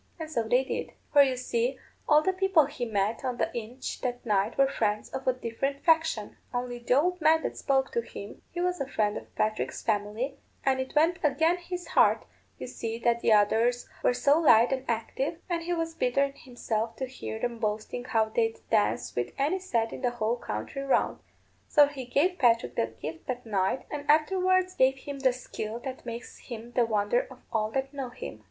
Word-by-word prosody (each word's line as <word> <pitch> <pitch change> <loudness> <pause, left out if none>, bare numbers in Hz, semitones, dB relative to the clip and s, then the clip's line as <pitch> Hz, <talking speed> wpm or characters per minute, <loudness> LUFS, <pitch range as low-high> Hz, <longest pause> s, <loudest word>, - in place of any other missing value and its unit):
And 315 -1 -6
so 235 - +1
they 250 +3 +4
did. 265 - -4 0.2
For 290 - +8
you 265 -2 +3
see, 250 +1 -1 0.3
all 300 0 +6
the 375 - +2
people 375 -5 +4
he 270 -3 -4
met 215 0 0
on 250 -2 -2
the - - -1
inch 240 +3 -5
that 245 -1 -3
night 210 0 +1
were 275 0 +5
friends 210 -6 -1
of 265 0 -5
a 255 - +4
different 255 +3 -3
faction; 320 -9 +2
only 245 0 -3
the 240 +1 +1
old 360 +3 0
man 320 +1 +4
that - - -2
spoke 270 -1 +1
to 470 - 0
him, - - -9
he 350 - -4
was 360 -2 0
a 275 - -2
friend 210 -6 0
of - - -9
Patrick's 215 0 -1
family, 215 +5 -1 0.3
and 265 -1 +3
it 260 +2 -4
went 325 +3 +3
again 320 +4 +3
his 355 0 -6
heart, - - +4 0.3
you - - -6
see, 225 0 -4
that 235 0 +1
the 230 - +2
others 225 +4 +3
were 245 - +3
so 285 +5 +4
light 235 -7 +6
and 260 0 -3
active, 240 +7 -2
and 345 -2 -1
he 350 +1 -2
was 330 -1 -2
bitter 275 -3 +2
in 275 0 -2
himself 230 -3 -3
to 265 - -3
hear 255 -3 -6
'em 235 0 -3
boasting 215 +3 -2
how 225 -3 +2
they'd 225 +1 0
dance 215 -2 +1
with 120 - -1
any 300 +8 +1
set 230 -12 -1
in - - -7
the 250 - +2
whole 235 -1 -1
country 110 - -5
round. 275 -1 +1 0.5
So 295 -2 +6
he 280 -3 -6
gave 345 +9 +1
Patrick 230 - +3
the 115 - +1
gift 150 +8 -8
that 250 -1 -4
night, 205 +3 0
and 295 -1 -5
afterwards 370 +4 +3
gave 265 -4 +3
him 280 +1 -7
the 265 -1 +4
skill 230 -3 -6
that 260 -2 -7
makes 235 +1 -7
him 235 -1 -8
the 240 -1 +3
wonder 210 +2 +1
of 260 - -14
all 215 -1 +1
that 270 +1 -2
know 270 -3 -4
him. 175 - -8
255 Hz, 210 wpm, -28 LUFS, 225-290 Hz, 0.5 s, For